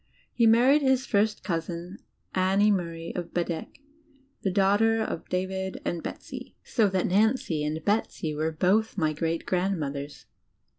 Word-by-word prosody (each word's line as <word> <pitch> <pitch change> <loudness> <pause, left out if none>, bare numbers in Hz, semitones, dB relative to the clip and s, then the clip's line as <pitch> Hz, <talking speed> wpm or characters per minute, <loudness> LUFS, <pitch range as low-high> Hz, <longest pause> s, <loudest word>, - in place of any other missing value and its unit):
He 235 -2 +4
married 250 +6 +5
his 265 -1 +2
first 210 -1 +1
cousin, 175 +1 -4 0.3
Annie 195 +3 +3
Murray, 170 -3 -2
of 175 -2 -5
Bedeque, 170 +3 -3 0.6
the 195 - 0
daughter 205 +4 +3
of 220 -6 -3
David 190 +1 -2
and 170 - -2
Betsy. - - -8
So 220 -4 +2
that 190 -1 0
Nancy 200 - +2
and 155 +1 -3
Betsy 200 -6 0
were 155 +2 -1
both 200 +8 +1
my 155 -4 +1
great 165 +2 -2
grand 185 0 0
mothers. 140 0 -5
185 Hz, 145 wpm, -27 LUFS, 165-210 Hz, 0.6 s, married